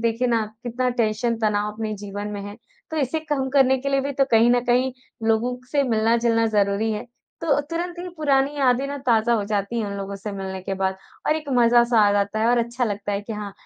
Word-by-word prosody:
देखिए 230 +2 0
ना 225 -2 +2 0.2
कितना 250 +1 -1
टेंशन 230 +2 0
तनाव 210 -1 0
अपने 215 0 -4
जीवन 205 +1 -6
में 205 -1 -5
है। 205 +1 -8 0.3
तो 315 - -4
इसे 290 +2 0
कम 290 -4 -2
करने 265 -1 +4
के 275 +2 -3
लिए 275 0 +2
भी 280 +1 -3
तो 275 0 +2
कहीं 230 +1 +5
न 245 0 +4
कहीं 250 +2 +2 0.4
लोगों 240 +3 +1
से 285 -1 +2
मिलना-जुलना 230 -1 +2
ज़रूरी 205 +1 +1
है। 210 +3 -4 0.4
तो 295 -3 +2
तुरंत 345 +4 -4
ही 360 +1 -5
पुरानी 280 -1 +2
यादें 260 0 +2
ना 285 - -4
ताज़ा 235 0 +3
हो 210 -3 0
जाती 205 +2 -2
हैं 215 - -2
उन 200 0 -5
लोगों 200 0 -5
से 205 +1 -6
मिलने 190 -1 -5
के 195 - -3
बाद 190 0 -1 0.3
और 305 - +3
एक 305 -2 -7
मज़ा-सा 235 -1 +5
आ - - +2
जाता 205 +1 0
है 225 - +2
और 245 - +3
अच्छा 235 +2 -1
लगता 205 -1 -3
है 200 - -1
कि 220 +2 -7
हाँ 210 -2 -6
230 Hz, 235 wpm, -23 LUFS, 210-265 Hz, 0.4 s, कहीं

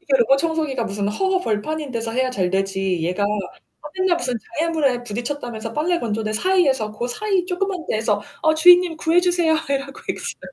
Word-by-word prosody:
이게 290 -7 -1
로봇 260 +3 +4
청소기가 310 -5 -1
무슨 200 -1 -2
허허벌판인 310 - -1
데서 230 -2 -3
해야 255 +2 0
잘 185 -7 -1
되지 195 -1 -1
얘가 180 +4 -1
아 205 +8 -5
맨날 370 -2 +2
무슨 250 -6 -1 0.2
장애물에 305 -7 +1
부딪혔다면서 235 -1 -4
빨래 340 +6 0
건조대 215 -3 -2
사이에서 270 - +2
고 225 +3 -3
사이 380 +8 0
쪼끄만 365 -1 -2
데에서 215 -2 0 0.2
"어 315 -1 +4
주인님 350 +1 +6
구해주세요." 345 0 +2 0.2
이러고 275 0 -3
있어. - - -5
270 Hz, 405 characters per minute, -21 LUFS, 215-335 Hz, 0.2 s, 주인님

